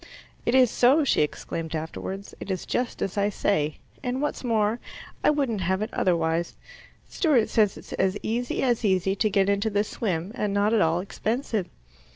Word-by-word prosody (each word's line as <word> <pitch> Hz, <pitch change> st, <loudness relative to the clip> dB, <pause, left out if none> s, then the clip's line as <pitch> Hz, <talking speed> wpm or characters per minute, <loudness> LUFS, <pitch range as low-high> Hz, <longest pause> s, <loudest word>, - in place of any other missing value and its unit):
"It 240 Hz, -, +3 dB
is 255 Hz, -3 st, +6 dB
so," 270 Hz, +6 st, +4 dB
she 275 Hz, -, +2 dB
exclaimed 160 Hz, +2 st, -3 dB
afterwards. 190 Hz, +5 st, -5 dB
"It -, -, -8 dB
is 185 Hz, -2 st, -2 dB
just 245 Hz, -1 st, -2 dB
as 195 Hz, +1 st, -2 dB
I 200 Hz, +1 st, +2 dB
say; 155 Hz, -7 st, 0 dB, 0.2 s
and 250 Hz, +1 st, -2 dB
what's 295 Hz, -1 st, -2 dB
more, 225 Hz, -1 st, +1 dB, 0.4 s
I -, -, +5 dB
wouldn't 270 Hz, -9 st, 0 dB
have 190 Hz, +3 st, 0 dB
it 220 Hz, -, -6 dB
otherwise; 165 Hz, -1 st, +1 dB, 0.5 s
Stewart 275 Hz, -, +2 dB
says 210 Hz, -4 st, +2 dB
it's -, -, -10 dB
as 190 Hz, +1 st, +1 dB
easy 240 Hz, +2 st, -1 dB
as 240 Hz, -3 st, +1 dB
easy 190 Hz, -1 st, +2 dB
to 215 Hz, -, +2 dB
get 195 Hz, -1 st, +2 dB
into 200 Hz, +2 st, +1 dB
the 205 Hz, 0 st, +1 dB
swim, 190 Hz, -4 st, -3 dB
and 210 Hz, -5 st, -2 dB
not 205 Hz, +2 st, +2 dB
at 225 Hz, -, +4 dB
all 165 Hz, +2 st, +2 dB
expensive." 215 Hz, 0 st, -2 dB
205 Hz, 185 wpm, -26 LUFS, 185-235 Hz, 0.5 s, is